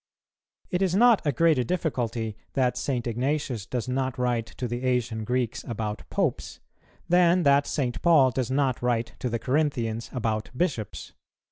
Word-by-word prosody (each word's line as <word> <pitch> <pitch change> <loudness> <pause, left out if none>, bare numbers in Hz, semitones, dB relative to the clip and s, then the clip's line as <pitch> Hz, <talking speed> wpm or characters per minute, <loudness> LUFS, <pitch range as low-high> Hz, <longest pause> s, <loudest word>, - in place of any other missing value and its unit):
It 180 - 0
is 185 -2 +2
not 235 +1 +5
a - - +4
greater 160 -5 +3
difficulty 120 - -2 0.2
that 125 -2 +1
St. 125 -4 -2
Ignatius 125 -2 -2
does 125 -2 -3
not 130 0 -1
write 120 -2 0
to 125 - -5
the 120 +1 -4
Asian 120 -3 0
Greeks 125 +1 -1
about 110 -2 -4
Popes, - - -2 0.5
than 175 0 +4
that 140 -1 +4
St. 125 -5 -2
Paul 150 -7 +5
does 125 0 -2
not 130 -2 0
write 115 -2 0
to 125 - -2
the 115 - -1
Corinthians 120 -3 -1
about 110 -4 -2
Bishops. 130 - -2
125 Hz, 155 wpm, -26 LUFS, 115-145 Hz, 0.5 s, not